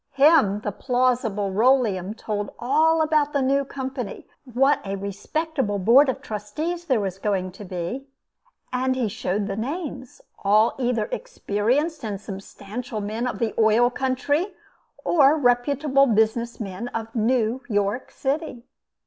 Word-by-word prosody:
Him 275 -8 +4
the 210 - -2
plausible 240 -4 0
Rolleum 215 -3 +2
told 205 -2 -3
all 315 +6 +3
about 305 -2 +1
the 280 - +1
new 275 +1 +2
Company; 265 -4 -6 0.3
what 270 +4 +3
a 195 0 -3
respectable 205 - -2
board 245 +9 +5
of 260 - -3
trustees 310 - -4
there 260 -8 +2
was 195 -2 -3
going 190 -3 -1
to 195 +3 -11
be 185 +9 -5 0.7
and 260 +1 +1
he 250 -3 0
showed 200 -1 -2
the 200 -1 -3
names; 265 - -5 0.2
all 210 +3 +4
either 245 -2 0
experienced 295 - -1
and 205 -3 -3
substantial 210 +4 -7
men 215 +4 -3
of 250 - -3
the 230 -3 -1
oil 225 +3 +4
country, 285 +8 -1 0.5
or 295 -2 +5
reputable 275 +2 +3
business 225 +1 +1
men 200 +1 -5
of 225 -1 -5
New 235 +1 +1
York 205 +3 0
City. 275 -3 -3
245 Hz, 140 wpm, -24 LUFS, 210-275 Hz, 0.7 s, board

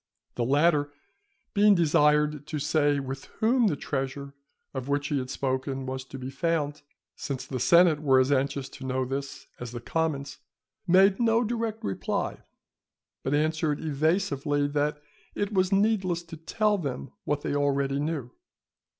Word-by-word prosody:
The 120 - -1
latter, 145 +3 +3 0.6
being 205 0 +5
desired 150 -2 +3
to 155 - -3
say 145 0 +2
with 135 0 -6
whom 235 +1 +3
the 175 - +1
treasure 140 0 -4 0.4
of 130 -1 -5
which 145 0 0
he 145 - +1
had 130 0 -5
spoken 130 0 -2
was 130 0 -4
to 135 - -9
be 130 0 -6
found, 150 0 -1 0.3
since 135 -2 -5
the 130 - -4
senate 170 +2 +5
were 135 -3 +4
as 130 +2 +2
anxious 140 0 0
to 135 - -11
know 130 0 -1
this 140 +2 -5
as 120 -1 -7
the 120 - -4
commons, 145 +1 -2 0.5
made 190 +2 +5
no 230 0 +3
direct 225 -1 -3
reply, 95 - -2 0.8
but 135 +2 0
answered 155 0 0
evasively 150 -1 0
that 150 +1 0 0.4
it 205 +1 -2
was 185 -1 +2
needless 195 -4 +1
to 165 -1 -10
tell 210 +6 0
them 135 -4 -5
what 145 0 -1
they - - -2
already 140 -1 +1
knew. 145 -5 -3
145 Hz, 155 wpm, -27 LUFS, 135-170 Hz, 0.8 s, being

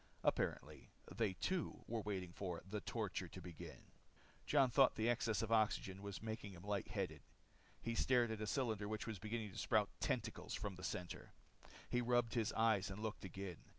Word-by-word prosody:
Apparently, - - 0 0.3
they 110 -4 +2
too, 180 - -1
were 115 -1 -1
waiting 95 -4 -3
for 90 -3 -3
the 105 +1 -3
torture 105 -5 -2
to 90 - -8
begin. 90 -2 -8 0.6
Jon 135 -4 +5
thought 135 0 +6
the 110 +1 +1
excess 115 -2 +2
of 115 - -2
oxygen 100 -3 +2
was 100 +1 -5
making 110 -3 -4
him 90 -1 -10
light 100 -2 -1
headed. - - -2 0.6
He 115 - -2
stared 120 -1 +4
at 110 -1 -3
a 110 - -1
cylinder 110 -5 0
which 110 0 -2
was 110 -5 -4
beginning 110 +1 -3
to - - -6
sprout - - +3
tentacles - - -1
from 100 -2 -3
the 90 - -10
circle. 90 -1 -3 0.6
He 125 - +2
rubbed 120 -1 +3
his 115 -3 +2
eyes 110 -3 +4
and 100 +3 -5
looked 110 -1 -3
again. 95 -2 -5
105 Hz, 185 wpm, -41 LUFS, 95-115 Hz, 0.6 s, thought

